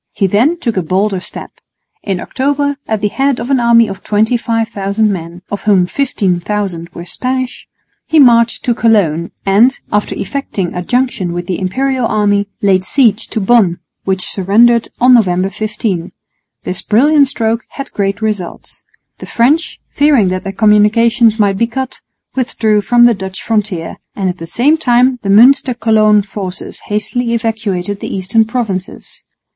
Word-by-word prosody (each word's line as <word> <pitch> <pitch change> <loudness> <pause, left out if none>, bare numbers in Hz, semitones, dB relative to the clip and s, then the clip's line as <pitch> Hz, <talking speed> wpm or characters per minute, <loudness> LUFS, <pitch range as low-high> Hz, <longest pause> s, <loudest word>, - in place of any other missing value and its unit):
He 195 - 0
then 235 - +2
took 230 - -2
a - - +2
bolder 190 +3 0
step. - - -8 0.5
In 195 -3 -3
October, 285 +4 -1
at 220 -2 -2
the 210 - +1
head 270 +4 0
of 250 - -4
an 270 - +3
army 235 -1 +4
of 195 -1 -8
25,000 220 -2 0
men, 170 0 -8
of 200 - -5
whom 195 -4 +4
15,000 190 -6 -2
were 170 - -8
Spanish, 255 +6 -4 0.4
he 320 - +3
marched 235 -3 +4
to 240 - +2
Cologne 190 -8 +1 0.2
and, 220 +7 +3
after 210 0 -1
effecting 205 -10 -4
a 180 - -4
junction 245 -5 -1
with 175 0 -4
the 180 0 -3
Imperial 255 +6 -1
army, 205 -1 +1 0.2
laid 190 -2 +3
siege 230 -1 +1
to - - -3
Bonn, 195 -4 +3 0.3
which 190 -2 -1
surrendered 230 +5 +2
on 250 +1 +5
November 190 -4 +2
15. 210 -4 -3 0.5
This 185 +1 -4
brilliant 280 +6 +3
stroke 230 -2 -1
had 275 -1 -8
great 200 +1 -2
results. 205 -5 -4 0.4
The - - -9
French, 285 +8 +1
fearing 285 -10 +3
that 185 0 -3
their 195 - -4
communications 220 +3 +3
might 200 -3 +1
be 230 - +2
cut, 260 +2 -5 0.3
withdrew 220 -4 0
from 240 +4 +4
the 240 - +5
Dutch 190 -2 -7
frontier; 210 -7 -2 0.2
and 190 -2 -1
at 180 - -5
the 165 - -7
same 285 - +2
time 250 -3 +2
the 195 - -4
Münster 250 +4 +4
Cologne 215 -2 +3
forces 195 -2 -7
hastily 230 +3 -1
evacuated 205 -4 -3
the - - -6
eastern 200 +4 +1
provinces. 215 -6 -5
215 Hz, 160 wpm, -14 LUFS, 195-240 Hz, 0.5 s, on